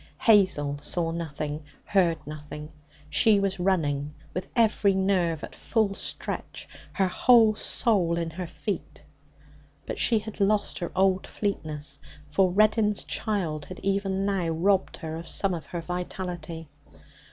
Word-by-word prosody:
Hazel 185 -10 +3
saw 165 +2 -1
nothing, 155 -2 -4 0.2
heard 175 -5 +3
nothing. 150 0 -8 0.3
She 210 +5 +5
was 195 -1 -1
running 150 -6 0 0.2
with 185 - -4
every 215 -4 +3
nerve 185 -5 +1
at - - -7
full 220 -4 0
stretch, - - -4 0.3
her 195 - +2
whole 225 +3 +5
soul 195 -6 +1
in 165 -1 -2
her 180 +2 -5
feet. 205 +4 -5 0.8
But - - -5
she 230 - +4
had 215 0 -6
lost 205 +1 +1
her 175 - -4
old 190 0 +2
fleetness, 150 -8 -3 0.3
for 185 +5 +3
Reddin's 210 +2 +3
child 165 -9 -2
had 185 - -9
even 195 0 0
now 195 -4 0
robbed 185 +4 +1
her 160 -1 -5
of 165 0 -8
some 195 -2 +2
of 160 -4 -5
her 170 +2 -4
vitality. 175 -2 -5
185 Hz, 140 wpm, -27 LUFS, 160-200 Hz, 0.8 s, She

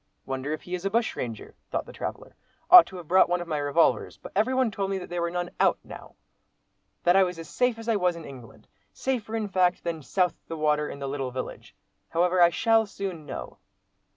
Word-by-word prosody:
"Wonder 135 +2 -4
if 155 - -4
he 180 - -8
is 180 0 -3
a 195 - 0
bushranger?" 195 - -2 0.2
thought - - -2
the - - -12
traveller; - - -6 0.4
"ought 360 -1 +11
to 190 - -11
have 175 -3 -10
brought 185 +1 +5
one 175 0 +1
of 175 - -6
my 155 -3 -1
revolvers; 145 +3 +1
but - - -11
everybody 255 +3 +2
told 195 -1 -2
me 195 - -1
that 180 -1 -8
there 175 -1 -2
were 170 - 0
none 175 0 -3
'out' - - +4
now; - - -12 0.9
that 175 +1 +4
I 195 - +6
was 180 -2 0
as 165 -1 -8
safe 245 - 0
as 225 0 -9
if - - +2
I - - +2
was 180 -2 +1
in 165 -2 -9
England—safer, 215 - -6
in 220 -2 -1
fact, 185 -2 +1
than 165 -2 -3
'south 180 +6 +1
the 165 - -5
water' 150 -1 +1
in - - -7
the 140 -1 -5
little 135 -1 -3
village. 130 +1 -7 0.3
However, 180 +2 +2
I 170 - +8
shall 225 +5 +2
soon 185 -6 -6
know." - - -7
175 Hz, 225 wpm, -26 LUFS, 155-200 Hz, 0.9 s, ought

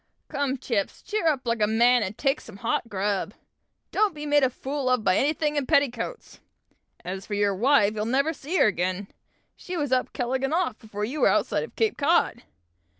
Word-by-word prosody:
"Come, 275 -1 -1
Chips, 225 -5 -2
cheer 420 -6 -1
up 275 -5 +1
like 230 -1 -1
a 210 - +4
man, 240 +3 +4
and 205 0 -3
take 275 0 0
some 215 -3 -12
hot 230 +2 -2
grub! 200 +1 -2 0.6
Don't 420 -5 +1
be 300 0 -6
made 290 0 +3
a 260 - +4
fool 270 +1 -3
of 250 -3 +2
by 185 - +3
anything 300 +3 +1
in 275 -3 -1
petticoats! 280 -7 0 0.7
As 190 +2 -5
for 205 - -3
your 205 -1 +2
wife, 215 0 +3
you'll 210 0 -2
never 275 +7 +1
see 310 +5 -3
her - - +5
again; 185 -1 -1 0.5
she 360 0 -6
was 290 -4 -2
'up 255 -1 +1
keeleg 255 +2 -2
and 270 +4 +1
off' 340 -10 -1
before 210 -1 -5
you 280 +7 -4
were - - +6
outside - - +1
of 465 - -10
Cape 445 -2 0
Cod. 290 -5 +2
255 Hz, 205 wpm, -25 LUFS, 210-290 Hz, 0.7 s, were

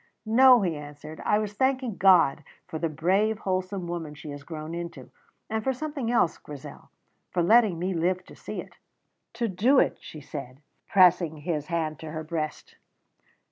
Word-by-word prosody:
"No," 245 +1 +6
he 170 -4 0
answered; 150 +1 -9
"I 210 - +3
was 210 -1 -2
thanking 260 -1 0
God 180 -7 +5 0.2
for 160 - -6
the 165 - 0
brave, 195 +8 +1
wholesome 185 -2 -2
woman 165 -3 -5
she 150 0 -9
has 145 0 -8
grown 155 +1 -7
into; 170 -6 -7 0.4
and 220 0 -2
for 265 - +1
something 280 -3 -4
else, 235 -8 +2
Grizel 145 -2 -11 0.4
for 175 - 0
letting 215 -1 +5
me 185 +3 -1
live 180 +2 0
to - - -14
see - - -7
it." - - -16 0.6
"To 235 0 -1
do 220 +8 +3
it," - - +3
she 155 - -10
said, 135 -1 -8 0.2
pressing 180 -4 +4
his 150 -1 -3
hand 160 -4 -2
to 160 - -7
her 155 0 -5
breast. 155 -1 -5
175 Hz, 175 wpm, -27 LUFS, 155-215 Hz, 0.6 s, No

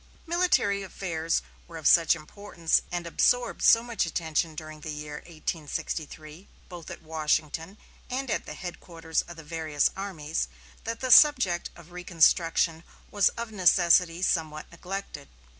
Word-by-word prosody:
Military 340 - +1
affairs 165 -4 -2 0.2
were 165 -1 -9
of 160 - -10
such 165 -2 +6
importance 170 0 -1
and 175 -1 -3
absorbed 245 +8 +1
so 230 - +6
much 235 -2 -1
attention 160 -1 -2
during 155 0 -9
the 155 - -7
year 150 0 -6
1863, 155 +1 -6 0.2
both 175 -3 -10
at - - -9
Washington 160 +3 -2 0.3
and 260 -1 -3
at - - -2
the - - -7
headquarters 170 -2 -4
of 175 -1 -10
the 160 - -10
various 155 -2 0
armies, 160 - -3 0.4
that 230 +1 -4
the 255 -1 -1
subject 250 - +6
of 170 0 -15
reconstruction 165 -1 +2 0.3
was 205 -1 +4
of 235 -1 -5
necessity 180 -2 +3
somewhat 155 -4 -1
neglected. 180 -4 -7
170 Hz, 140 wpm, -27 LUFS, 160-195 Hz, 0.4 s, such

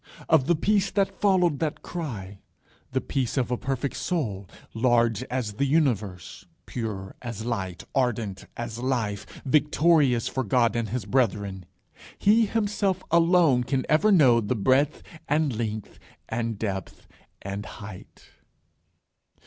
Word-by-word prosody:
Of 150 -4 +4
the 175 - +4
peace 200 +4 +2
that 200 -1 -1
followed 180 -7 +3
that 155 -2 -2
cry, 105 - -6 0.5
the 130 0 0
peace 130 +1 -2
of 125 -2 0
a - - +2
perfect 135 +2 -3
soul, 105 - -2 0.2
large 115 -2 +2
as 120 -4 -3
the 140 +7 0
universe, 115 - -1 0.2
pure 105 -5 -5
as 115 -3 -6
light, 95 -7 -3
ardent 115 -7 -1
as 120 -1 -5
life, 120 -6 -2 0.2
victorious 150 -3 +3
for 130 - -2
God 120 +2 +2
and 115 -2 -1
his 120 -1 -3
brethren, 100 -6 0 0.5
he 220 +2 +4
himself 200 -3 0
alone 165 -6 +4
can 130 +1 -1
ever 160 +8 +4
know 130 - +6
the 110 +4 -1
breadth 130 +7 +2 0.3
and 150 -4 +1
length, 110 -2 -4 0.3
and 115 -1 -2
depth 95 -3 -5 0.4
and 100 +1 -5
height. 100 -3 -11
125 Hz, 135 wpm, -26 LUFS, 105-150 Hz, 0.5 s, know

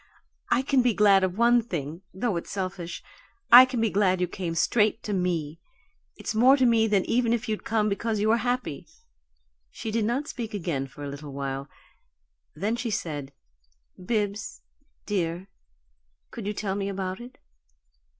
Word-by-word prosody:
"I 245 +2 +2
can 270 -1 +3
be 245 -3 +2
glad 200 -2 +5
of 185 0 -1
one 240 +1 +5
thing, 165 - -5
though 205 +2 -2
it's 170 - -5
selfish. 185 -3 -5 0.5
I 250 +2 +12
can 255 -2 -3
be 225 -2 +1
glad 190 -2 +2
you 180 - +1
came 175 -2 -4
straight 215 +5 +2
to 210 - -3
me. 170 -4 -1 0.6
It's - - -5
more 255 +5 +6
to 260 - +3
me 230 -2 +4
than 200 -3 +2
even 235 -1 +1
if 240 +1 -2
you'd 215 -1 -3
come 220 -2 +1
because 215 +1 -1
you 215 +1 +1
were 230 - +4
happy." 245 - -2 0.8
She 220 - -6
did 220 -1 0
not 255 +6 -1
speak 225 -6 -5
again 165 -8 -2
for 145 +2 -11
a - - -4
little 140 0 -8
while; 135 0 -4 0.9
then 215 +4 -1
she 240 0 -3
said: 150 -9 -4 0.7
"Bibbs 210 0 -2 0.4
dear 180 -2 -2 0.8
could - - -6
you 210 - -1
tell 195 -2 -2
me 200 0 -2
about 190 +1 -4
it? 245 +1 -12
205 Hz, 170 wpm, -26 LUFS, 175-230 Hz, 0.9 s, I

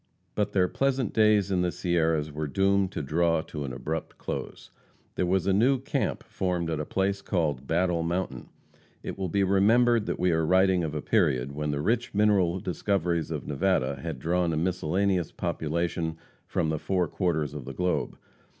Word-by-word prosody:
But 105 - -1
their 90 -2 +3
pleasant 135 0 0
days 105 -2 +3
in 90 -2 +2
the 90 -1 +1
Sierras 80 -4 0
were 75 +1 -3
doomed 95 +4 +2
to - - -3
draw 80 +3 +1
to 75 -2 -6
an 65 - -5
abrupt 80 +6 -5
close. - - -6 0.4
There 90 - -1
was 95 0 +1
a 95 - +2
new 125 +7 +4
camp 130 - -2
formed 90 -3 -2
at 80 - -2
a 75 - -2
place 100 +1 0
called 75 -9 -1
Battle 85 0 +1
Mountain. 85 -6 -3 0.5
It - - -5
will 95 -2 -3
be 100 +3 +1
remembered 110 +4 +3
that - - -2
we 90 0 +2
are 80 0 +1
writing 95 +1 +3
of 75 -1 -3
a 75 - -3
period 70 - +1
when 75 +1 -3
the 70 0 -1
rich 115 +5 0
mineral 100 -4 +3
discoveries 90 -3 -1
of 75 -5 -4
Nevada 70 -3 0
had - - -4
drawn 85 0 0
a - - -1
miscellaneous 90 +1 0
population 85 -1 -2 0.3
from 80 - 0
the 80 -1 -1
four 90 0 0
quarters 80 -5 -1
of 75 -4 -7
the 65 - -6
globe. 90 +3 -1
90 Hz, 185 wpm, -27 LUFS, 80-95 Hz, 0.5 s, new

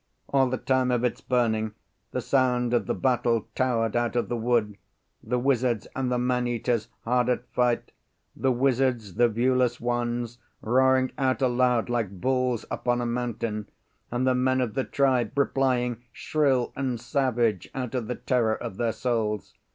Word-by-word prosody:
All 135 -2 +3
the 130 - -1
time 130 0 +1
of 125 -1 +1
its 125 - -1
burning, 110 -4 0 0.3
the - - -3
sound 125 -2 +1
of 115 -5 +1
the - - 0
battle 115 +2 +1
towered 115 -3 0
out 120 0 0
of 120 - 0
the 120 - -1
wood; 115 -3 0 0.4
the 125 +3 -1
wizards 125 -3 +1
and 130 -1 -1
the 125 - +1
man 125 0 0
eaters 120 -2 -1 0.2
hard 125 +1 +1
at 125 0 0
fight; 125 -1 +1 0.4
the 135 - +1
wizards, 125 -5 +1
the 120 +4 +3
viewless 125 +1 +1
ones, 120 0 -2 0.2
roaring 130 +2 +3
out 130 0 +1
aloud 125 -2 +2
like 110 -6 -2
bulls 125 0 0
upon 120 0 0
a 120 - -1
mountain, 115 -3 -3 0.4
and 120 +2 -1
the 130 - +3
men 130 +1 +2
of 125 -4 -1
the 135 - -1
tribe 130 -4 +1
replying 125 -4 +1
shrill 135 -3 0
and 130 -3 -2
savage 120 - 0
out 125 -3 -3
of 125 -4 -2
the 125 - -2
terror 115 -4 +1
of 95 - -7
their 115 -2 0
souls. 110 -6 -2
120 Hz, 165 wpm, -26 LUFS, 115-130 Hz, 0.4 s, All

